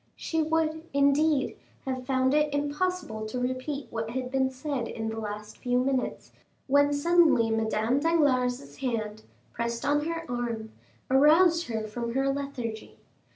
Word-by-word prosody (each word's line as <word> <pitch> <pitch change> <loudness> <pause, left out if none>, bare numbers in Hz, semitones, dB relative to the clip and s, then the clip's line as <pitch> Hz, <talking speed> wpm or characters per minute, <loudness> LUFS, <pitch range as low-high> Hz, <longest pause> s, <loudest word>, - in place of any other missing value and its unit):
She 320 -1 -1
would, 315 0 0
indeed, 280 0 +2 0.3
have 255 -1 -4
found 260 0 +2
it 300 0 +2
impossible 290 -6 -2
to 250 +3 -4
repeat 255 +3 -3
what 225 -1 -3
had 255 +1 -4
been 265 -1 +2
said 260 -1 -3
the 225 0 -4
last 210 0 -6
few 245 -1 0
minutes, 260 0 -1 0.3
when 285 +1 +4
suddenly 295 -6 +4
Madame 225 +3 +1
Danglars' 280 -5 +1
hand, 220 -5 -3 0.3
pressed 235 +1 -3
on 295 +1 +2
her 330 0 -3
arm, 235 -3 -3 0.4
aroused 325 +5 +5
her 220 -2 -2
from 235 +2 -4
her 270 0 +2
lethargy. 260 -6 -5
265 Hz, 140 wpm, -28 LUFS, 235-295 Hz, 0.4 s, aroused